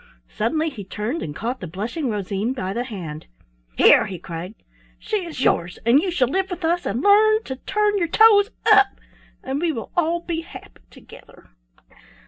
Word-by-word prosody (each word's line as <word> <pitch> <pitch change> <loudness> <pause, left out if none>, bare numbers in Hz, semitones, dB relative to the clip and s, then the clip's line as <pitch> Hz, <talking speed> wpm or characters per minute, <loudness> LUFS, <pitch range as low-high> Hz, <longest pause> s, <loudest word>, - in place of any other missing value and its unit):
Suddenly 310 +8 0
he 215 -7 -8
turned 215 - -4
and 145 - -6
caught 240 +7 -4
the 180 - -7
blushing 230 - -4
Rosine 205 +2 -2
by 190 -7 -4
the 240 +3 -3
hand. 170 -10 -8 0.5
"Here!" - - +6
he 190 - -6
cried; 170 +4 -8 0.4
"she 435 - -2
is 300 -5 -5
yours, 175 +1 +1
and 240 +4 +5
you 375 - -2
shall 290 -8 +1
live 380 +8 -1
with 360 -2 -5
us, 345 +2 0
and 230 +7 -2
learn 435 +2 +5
to 265 - -6
turn 415 +6 0
your 340 - 0
toes 415 +3 +5 0.2
up, 415 -2 +6 0.6
and 270 +3 -3
we 340 -1 +1
will 230 -7 -7
all 340 0 +1
be 335 -1 -4
happy 195 - -13
together." - - -17
265 Hz, 180 wpm, -22 LUFS, -, 0.6 s, Here